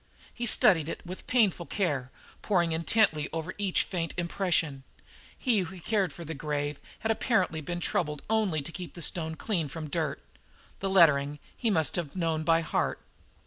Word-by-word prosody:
He 240 Hz, 0 st, -3 dB
studied 185 Hz, -, +5 dB
it -, -, -6 dB
with 180 Hz, +2 st, -7 dB
painful 205 Hz, -8 st, +2 dB
care, 145 Hz, -11 st, -1 dB, 0.3 s
poring 175 Hz, -5 st, +2 dB
intently 160 Hz, -2 st, +2 dB
over 165 Hz, +3 st, -4 dB
each 195 Hz, -3 st, +2 dB
faint 170 Hz, -3 st, -3 dB
impression. 170 Hz, -5 st, 0 dB, 0.5 s
He 240 Hz, -6 st, +2 dB
who 185 Hz, 0 st, -4 dB
cared 195 Hz, -1 st, 0 dB
for 170 Hz, +3 st, -9 dB
the 160 Hz, -, -4 dB
grave 145 Hz, 0 st, -3 dB, 0.2 s
had 225 Hz, -, +1 dB
apparently 190 Hz, -8 st, +1 dB
been 175 Hz, +4 st, -4 dB
troubled 150 Hz, -3 st, -1 dB
only 210 Hz, -9 st, +1 dB
to 165 Hz, -, -6 dB
keep 180 Hz, 0 st, -7 dB
the 170 Hz, -, -6 dB
stone 160 Hz, -1 st, 0 dB
free 170 Hz, -4 st, -1 dB
from 155 Hz, +1 st, -7 dB
dirt 155 Hz, -, -2 dB, 0.5 s
the 195 Hz, -, -1 dB
lettering 150 Hz, -6 st, +5 dB, 0.2 s
he 235 Hz, -, 0 dB
must 160 Hz, -7 st, +1 dB
have 170 Hz, -3 st, -4 dB
known 165 Hz, -3 st, 0 dB
by 165 Hz, +1 st, +4 dB
heart. 160 Hz, -, -1 dB
170 Hz, 170 wpm, -29 LUFS, 155-190 Hz, 0.5 s, studied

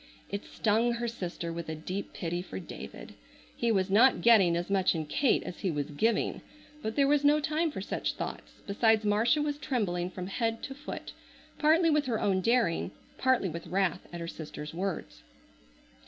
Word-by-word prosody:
It 200 Hz, 0 st, -4 dB
stung 225 Hz, +3 st, +1 dB
her 235 Hz, 0 st, -2 dB
sister 175 Hz, -6 st, -4 dB
with 170 Hz, -1 st, -5 dB
a 160 Hz, -, -3 dB
deep 185 Hz, +6 st, -5 dB
pity 175 Hz, 0 st, -3 dB
for 185 Hz, -, -7 dB
David. -, -, -9 dB, 0.4 s
He 235 Hz, -1 st, +1 dB
was 190 Hz, -2 st, +1 dB
not 240 Hz, +6 st, +5 dB
getting 200 Hz, -8 st, +6 dB
as 175 Hz, -, -2 dB
much 190 Hz, -3 st, +2 dB
in 160 Hz, -1 st, -2 dB
Kate 255 Hz, -, +2 dB
as 180 Hz, -, -7 dB
he 190 Hz, -, -1 dB
was 150 Hz, -2 st, -2 dB
giving. 220 Hz, +10 st, 0 dB, 0.4 s
But 220 Hz, +1 st, -3 dB
there 280 Hz, -1 st, +4 dB
was 290 Hz, 0 st, +3 dB
no 295 Hz, +1 st, +5 dB
time 310 Hz, +2 st, 0 dB
for 280 Hz, -, -5 dB
such -, -, -2 dB
thoughts, -, -, -7 dB
besides 220 Hz, +1 st, +3 dB
Marcia 225 Hz, +9 st, +3 dB
was 290 Hz, -1 st, -2 dB
trembling 180 Hz, -11 st, -1 dB
from 185 Hz, 0 st, -6 dB
head 225 Hz, +3 st, -2 dB
to 270 Hz, -, -5 dB
foot, 285 Hz, +2 st, -7 dB, 0.5 s
partly 320 Hz, +2 st, +4 dB
with 300 Hz, -2 st, +2 dB
her 225 Hz, -3 st, 0 dB
own 190 Hz, -2 st, +1 dB
daring, 230 Hz, -5 st, +2 dB, 0.3 s
partly 260 Hz, -6 st, +3 dB
with 170 Hz, -1 st, -6 dB
wrath 185 Hz, -2 st, 0 dB
at 175 Hz, -, -6 dB
her 170 Hz, -, -5 dB
sister's 150 Hz, -2 st, -7 dB
words. 165 Hz, -, -4 dB
205 Hz, 185 wpm, -30 LUFS, 175-245 Hz, 0.5 s, getting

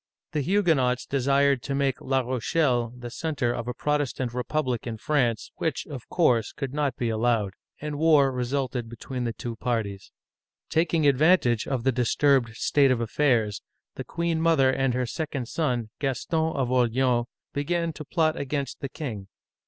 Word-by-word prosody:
The 150 Hz, -3 st, 0 dB
Huguenots 140 Hz, -8 st, +2 dB
desired 140 Hz, 0 st, +2 dB
to 140 Hz, -, -3 dB
make 135 Hz, -2 st, 0 dB
La 135 Hz, 0 st, +1 dB
Rochelle 125 Hz, 0 st, 0 dB
the 120 Hz, -1 st, -7 dB
center 135 Hz, -7 st, -1 dB
of 120 Hz, 0 st, -4 dB
a 125 Hz, -, -2 dB
Protestant 135 Hz, -4 st, -1 dB
republic 125 Hz, -1 st, -2 dB
in 115 Hz, -1 st, -4 dB
France, 120 Hz, -4 st, 0 dB
which, 160 Hz, -5 st, -2 dB
of 135 Hz, -6 st, -9 dB
course, 125 Hz, -10 st, +2 dB
could 135 Hz, -1 st, -5 dB
not 145 Hz, -2 st, 0 dB
be 120 Hz, -, -1 dB
allowed; 110 Hz, -3 st, +1 dB, 0.3 s
and 150 Hz, -1 st, -4 dB
war 150 Hz, -4 st, +5 dB
resulted 125 Hz, -1 st, -2 dB
between 120 Hz, +2 st, -5 dB
the 115 Hz, -, -1 dB
two 115 Hz, -1 st, -6 dB
parties. 105 Hz, -5 st, -3 dB, 0.6 s
Taking 160 Hz, -1 st, +2 dB
advantage 140 Hz, -4 st, +4 dB
of 130 Hz, -4 st, -1 dB
the 135 Hz, -, +3 dB
disturbed 125 Hz, -1 st, +2 dB
state 140 Hz, +3 st, +3 dB
of 130 Hz, -2 st, +2 dB
affairs, 115 Hz, -3 st, +1 dB, 0.3 s
the -, -, -6 dB
queen 170 Hz, -1 st, -1 dB
mother 155 Hz, -5 st, +4 dB
and 130 Hz, -1 st, 0 dB
her 125 Hz, 0 st, 0 dB
second 140 Hz, -1 st, -4 dB
son, 125 Hz, -7 st, -1 dB
Gaston 160 Hz, +4 st, 0 dB
of 130 Hz, -3 st, 0 dB
Orleans, 125 Hz, -1 st, +2 dB, 0.3 s
began 165 Hz, +3 st, -1 dB
to 150 Hz, -, -8 dB
plot 155 Hz, +1 st, +1 dB
against 140 Hz, 0 st, -3 dB
the 140 Hz, -, -4 dB
king. 110 Hz, -12 st, -6 dB
130 Hz, 160 wpm, -26 LUFS, 120-150 Hz, 0.6 s, war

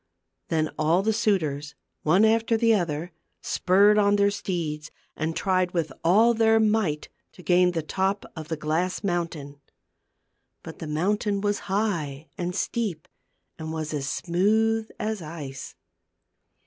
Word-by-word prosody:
Then 155 Hz, -2 st, 0 dB
all 165 Hz, +5 st, +3 dB
the 220 Hz, +1 st, +2 dB
suitors, 155 Hz, -10 st, 0 dB, 0.3 s
one 180 Hz, +8 st, +4 dB
after 225 Hz, +1 st, +2 dB
the 230 Hz, 0 st, +4 dB
other, 170 Hz, -3 st, -1 dB, 0.3 s
spurred 205 Hz, +3 st, +3 dB
on 205 Hz, 0 st, +4 dB
their 200 Hz, 0 st, +3 dB
steeds, 160 Hz, -6 st, -4 dB, 0.3 s
and 160 Hz, +1 st, -2 dB
tried 185 Hz, -2 st, 0 dB
with 160 Hz, -5 st, -1 dB
all 215 Hz, +8 st, +5 dB
their 225 Hz, 0 st, +4 dB
might 210 Hz, -9 st, +1 dB, 0.2 s
to 180 Hz, -, -14 dB
gain 180 Hz, 0 st, +3 dB
the 165 Hz, -2 st, -2 dB
top 190 Hz, +5 st, -1 dB
of 160 Hz, -2 st, -7 dB
the 160 Hz, -1 st, -3 dB
glass 160 Hz, +6 st, -1 dB
mountain. 165 Hz, -6 st, -3 dB, 1.0 s
But -, -, -10 dB
the 160 Hz, -, -6 dB
mountain 200 Hz, +6 st, 0 dB
was 205 Hz, 0 st, 0 dB
high 165 Hz, -8 st, -2 dB
and 180 Hz, 0 st, -3 dB
steep, 200 Hz, -7 st, -2 dB, 0.5 s
and 160 Hz, 0 st, -5 dB
was 155 Hz, -1 st, -4 dB
as 140 Hz, -2 st, -2 dB
smooth 220 Hz, +5 st, +1 dB
as 215 Hz, -2 st, -2 dB
ice. 150 Hz, -4 st, -8 dB
180 Hz, 140 wpm, -25 LUFS, 155-210 Hz, 1.0 s, all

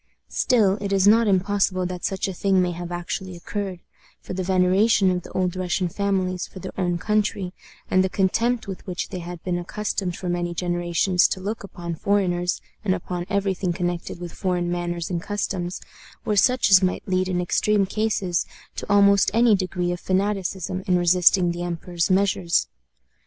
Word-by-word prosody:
Still, 210 Hz, -5 st, +2 dB
it 200 Hz, -1 st, -3 dB
is 195 Hz, 0 st, +3 dB
not 225 Hz, +2 st, +5 dB
impossible 190 Hz, -1 st, +1 dB
that 180 Hz, 0 st, -5 dB
such 195 Hz, +1 st, -1 dB
a 190 Hz, -, -4 dB
thing 190 Hz, +1 st, +2 dB
may 180 Hz, -1 st, +1 dB
have 175 Hz, 0 st, -6 dB
actually 175 Hz, +1 st, -4 dB
occurred; 190 Hz, 0 st, -5 dB, 0.4 s
for -, -, -8 dB
the 185 Hz, -, -2 dB
veneration 190 Hz, +2 st, +3 dB
of 180 Hz, 0 st, -1 dB
the -, -, -12 dB
old 185 Hz, -1 st, 0 dB
Russian 180 Hz, 0 st, -1 dB
families 185 Hz, -1 st, -1 dB
for -, -, -13 dB
their 185 Hz, -, -6 dB
own 175 Hz, -2 st, 0 dB
country, 205 Hz, -1 st, -1 dB, 0.3 s
and 185 Hz, 0 st, +3 dB
the 190 Hz, -, 0 dB
contempt 225 Hz, +5 st, +1 dB
with 190 Hz, -2 st, -6 dB
which 180 Hz, -1 st, -3 dB
they 185 Hz, -, -5 dB
had 175 Hz, -1 st, -8 dB
been 175 Hz, -1 st, -1 dB
accustomed 185 Hz, -1 st, -3 dB
for 185 Hz, -, -6 dB
many 175 Hz, 0 st, -2 dB
generations 175 Hz, +1 st, +2 dB
to -, -, -3 dB
look 205 Hz, +4 st, -4 dB
upon 175 Hz, -3 st, -6 dB
foreigners, 180 Hz, -1 st, 0 dB, 0.2 s
and 190 Hz, -3 st, +1 dB
upon 175 Hz, 0 st, -5 dB
every 200 Hz, -1 st, +1 dB
thing 180 Hz, -1 st, -2 dB
connected 175 Hz, -1 st, -3 dB
with 175 Hz, -1 st, -7 dB
foreign 180 Hz, -2 st, -1 dB
manners 175 Hz, 0 st, -3 dB
and 170 Hz, -1 st, -1 dB
customs, 185 Hz, -3 st, -3 dB, 0.5 s
were 215 Hz, -, +1 dB
such 240 Hz, +1 st, +3 dB
as 190 Hz, -1 st, +8 dB
might 185 Hz, -1 st, -1 dB
lead 185 Hz, 0 st, +1 dB
in 180 Hz, -1 st, 0 dB
extreme 200 Hz, +3 st, +2 dB
cases, 195 Hz, -3 st, -1 dB, 0.3 s
to -, -, -5 dB
almost 200 Hz, -1 st, +5 dB
any 230 Hz, -2 st, +5 dB
degree 180 Hz, -2 st, -2 dB
of 175 Hz, -, -3 dB
fanaticism 190 Hz, -1 st, -1 dB
in 180 Hz, -1 st, +3 dB
resisting 175 Hz, 0 st, +4 dB
the 175 Hz, 0 st, -5 dB
emperor's 175 Hz, 0 st, -2 dB
measures. 190 Hz, -2 st, +2 dB
185 Hz, 180 wpm, -23 LUFS, 175-200 Hz, 0.5 s, as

